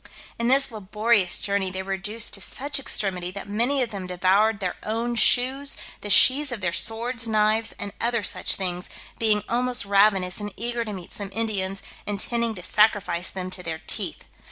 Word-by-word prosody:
In 235 - 0
this 270 +1 +5
laborious 210 -1 +1
journey 200 -2 -1
they 190 +1 -5
were 195 - -7
reduced 210 +3 -2
to 200 - -3
such 280 +7 -1
extremity, 195 -8 0
that 195 +2 -8
many 240 +7 +2
of 235 - -5
them 195 -3 -6
devoured 195 +4 +2
their 185 -3 -3
own 230 +3 -2
shoes, 260 +4 +2 0.2
the 205 - -6
sheaths 270 +7 +6
of 240 - -4
their 175 -3 -1
swords, 230 +4 0
knives, 215 +1 +2
and 200 0 -6
other 235 -2 0
such - - +2
things, 180 -1 -3 0.3
being 215 -2 +4
almost 245 -1 0
ravenous, 195 -2 +2
and 205 0 -5
eager 235 +2 -2
to 215 - -6
meet 185 -4 -9
some 200 -1 -5
Indians, 195 -3 -2 0.2
intending 225 +3 -1
to 180 - -9
sacrifice 195 -4 +1
them 185 -1 -6
to 180 - -3
their 160 -2 -6
teeth. - - -2
210 Hz, 180 wpm, -24 LUFS, 190-235 Hz, 0.3 s, sheaths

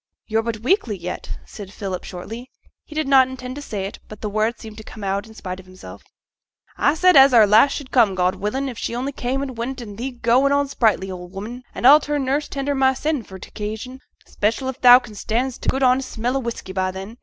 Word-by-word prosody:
'You're 225 0 0
but 225 -1 -4
weakly 250 - +1
yet,' 180 0 -6
said 200 -3 -10
Philip 195 -3 -5
shortly; 225 +8 -8 0.3
he 305 - -13
did 310 -2 -1
not 265 -2 +6
intend 255 0 -7
to - - -6
say 205 -8 -4
it, 195 - -7
but 215 - -11
the 210 - -3
words 215 +3 0
seemed 220 -2 -10
to 220 - -9
come 215 - -10
out 200 +2 -2
in 220 - -15
spite 185 -3 -6
of 185 - -14
himself. 185 0 -12 0.8
'A 285 - +3
said 365 +2 +4
as 270 -2 +8
our 220 -2 +8
lass 220 +7 +5
should 280 -3 -6
come, 225 -7 +4
God 180 0 +2
willin', 260 +7 -3
if 245 -4 -6
she 235 - -3
only 260 +3 -2
came 265 +1 -2
and 265 -3 -6
went, 260 +3 -3
an' 205 -4 -9
thee 250 +4 -3
goin' 250 +2 +2
on 285 0 +2
sprightly, 220 -8 +1
old 180 0 -9
'ooman. 225 +6 -6
An' - - -3
a'll 290 +4 +9
turn 290 -2 -2
nurse 285 +3 0
tender 280 0 -2
mysen 270 +2 +1
for 190 -3 -11
t' - - -11
occasion, 220 +5 -6 0.3
'special 225 +5 -1
if 260 - -7
thou 245 -1 +10
can 235 -4 -7
stand 240 +5 -2
t' - - -1
good 265 +1 0
honest 255 +1 +3
smell 245 +3 -2
o' - - +1
whisky 235 -6 -6
by 185 0 0
then. 195 +5 -8
235 Hz, 240 wpm, -21 LUFS, 210-265 Hz, 0.8 s, thou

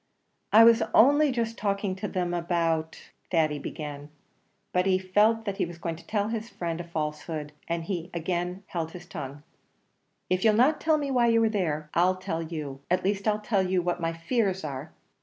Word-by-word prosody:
"I 220 +2 +9
was 230 0 +7
only 290 +4 +6
just 230 -2 -2
talking 200 -2 -1
to 205 +2 -3
them 180 -2 -2
about 165 -2 -1
" - - -42
Thady 155 -4 +1
began; 145 0 -6 0.6
but 180 +1 +2
he 185 -1 +4
felt 210 +4 +2
that 200 -2 -3
he 200 - +1
was 170 0 -9
going 165 -1 -3
to 165 - -16
tell 210 -1 0
his 225 0 -4
friend 170 -4 -4
a - - -6
falsehood, 155 -2 -4 0.2
and 170 -1 -2 0.3
again 175 +2 -3
held 165 -3 -4
his 175 -1 -9
tongue. 145 -3 -7 0.8
"If 185 0 0
you'll 220 -2 +5
not 265 +7 +3
tell 315 -1 +3
me 285 -2 -2
why 245 -2 +3
you 230 0 +4
were 225 -1 +3
there, 155 -8 -2
I'll 180 +2 +3
tell 165 -3 -3
you; 150 -4 -6
at 180 +1 +1
least, 200 +2 0
I'll 210 0 +1
tell 210 -2 +1
you 185 -1 +1
what 175 0 -1
my 165 0 0
fears 190 +2 -1
are. 145 +1 -5
180 Hz, 195 wpm, -27 LUFS, 165-215 Hz, 0.8 s, I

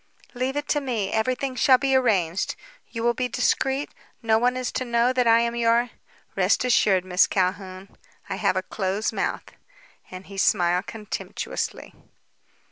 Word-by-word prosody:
"Leave 255 +2 -2
it 290 0 -3
to 295 - +1
me. 230 -8 -2
Everything 255 +4 -1
shall 260 0 +5
be 270 0 +1
arranged. 195 -8 +1 0.3
You 230 -1 -6
will 240 0 +3
be 250 +1 -2
discreet? 270 +2 0 0.3
No 220 -1 +3
one 250 +2 +1
is 255 -1 -3
to - - -2
know 240 +1 +1
that 250 -2 +1
I 230 0 +5
am 235 0 -1
your 235 +1 +2 0.2
" - - -33
"Rest - - +2
assured, 195 -6 +3
Miss 180 0 +3
Calhoun. 185 0 -2 0.4
I - - -4
have - - +1
a - - -1
close 195 +1 -2
mouth," - - -2 0.7
and 185 +1 -9
he 195 0 -8
smiled 180 0 +2
contemptuously. 215 -2 -5
235 Hz, 165 wpm, -24 LUFS, 195-255 Hz, 0.7 s, shall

